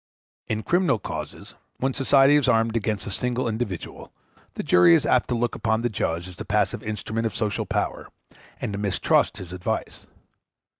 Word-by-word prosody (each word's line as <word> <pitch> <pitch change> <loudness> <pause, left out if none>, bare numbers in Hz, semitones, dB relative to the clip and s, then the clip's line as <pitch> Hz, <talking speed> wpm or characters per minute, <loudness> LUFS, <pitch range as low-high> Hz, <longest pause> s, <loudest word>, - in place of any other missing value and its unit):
In 110 0 -2
criminal 175 -7 +2
causes, 105 - -7 0.2
when 135 +1 -1
society 135 +1 +5
is 145 -2 +3
armed 115 -1 +2
against 110 -2 -1
a 100 - -4
single 125 +5 -1
individual, 110 -6 -5 0.4
the - - -4
jury 90 -1 +6
is - - +1
apt - - +2
to 125 - +1
look 120 0 0
upon 110 0 0
the 120 - +1
judge 85 -4 -2
as 90 -2 -11
the - - -5
passive - - 0
instrument 110 +1 -3
of - - -7
social 105 -2 -2
power, - - -2 0.5
and 105 - -3
to 100 - -3
mistrust 100 0 +1
his 90 -3 -8
advice. 90 -1 -4
110 Hz, 180 wpm, -24 LUFS, 100-120 Hz, 0.5 s, jury